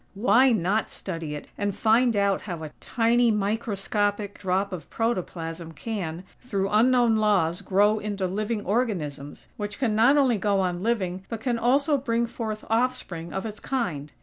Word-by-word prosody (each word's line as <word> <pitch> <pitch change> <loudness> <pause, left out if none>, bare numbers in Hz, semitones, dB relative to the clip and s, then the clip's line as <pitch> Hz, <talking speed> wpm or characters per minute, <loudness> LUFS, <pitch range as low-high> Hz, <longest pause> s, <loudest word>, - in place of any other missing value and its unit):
Why 240 +5 +4
not 210 0 +1
study 165 -5 -5
it, 145 - -7
and 205 -1 -1
find 230 +1 +3
out 200 -1 +2
how 175 -5 -6
a 155 - -7
tiny, 235 0 +2
microscopic 205 -1 -1
drop 190 +1 0
of 170 -3 -7
protoplasm, 170 -7 -3
can, 180 -3 -4 0.2
through 200 -6 -2
unknown 235 +1 +4
laws 190 -6 +2
grow 205 +3 +3
into 205 -2 -3
living 210 +3 -2
organisms, 170 - -2
which 205 -1 -5
can 245 -5 0
not 235 +7 +5
only 255 -6 +3
go 200 0 +1
on 180 -2 -1
living, 190 -5 -1
but 230 - -4
can 240 0 -1
also 280 +5 +3
bring 235 -2 0
forth 220 -2 -5
offspring 225 -8 -1
of 190 +3 -4
its 215 -1 -6
kind? 165 - -3
210 Hz, 160 wpm, -26 LUFS, 185-230 Hz, 0.2 s, not